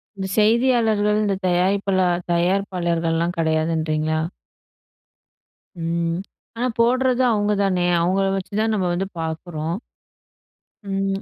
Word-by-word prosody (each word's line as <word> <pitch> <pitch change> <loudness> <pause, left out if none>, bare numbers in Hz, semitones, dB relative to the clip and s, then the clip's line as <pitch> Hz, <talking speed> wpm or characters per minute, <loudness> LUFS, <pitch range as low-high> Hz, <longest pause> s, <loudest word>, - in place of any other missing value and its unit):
இந்த 190 -1 -4
செய்தியாளர்கள், 220 -2 +3
இந்த 200 -2 +1
தயாரிப்பிளா 185 +1 +2 0.3
தயாரிப்பாளர்கள்லாம் 170 -2 0
கிடையாதுன்றீங்களா? 155 -1 0 1.6
ம். 170 0 -1 0.4
ஆனா 245 +2 0
போடுறது 255 +2 +3
அவுங்க 210 -1 +1
தானே! 180 -2 +1
அவுங்கள 190 +3 +1
வச்சுதான் 215 +3 -1
நம்ம 190 -3 0
வந்து 190 +2 -1
பார்க்குறோம். 160 +1 -4 1.1
ம். 195 0 -2
190 Hz, 90 wpm, -22 LUFS, 170-205 Hz, 1.6 s, செய்தியாளர்கள்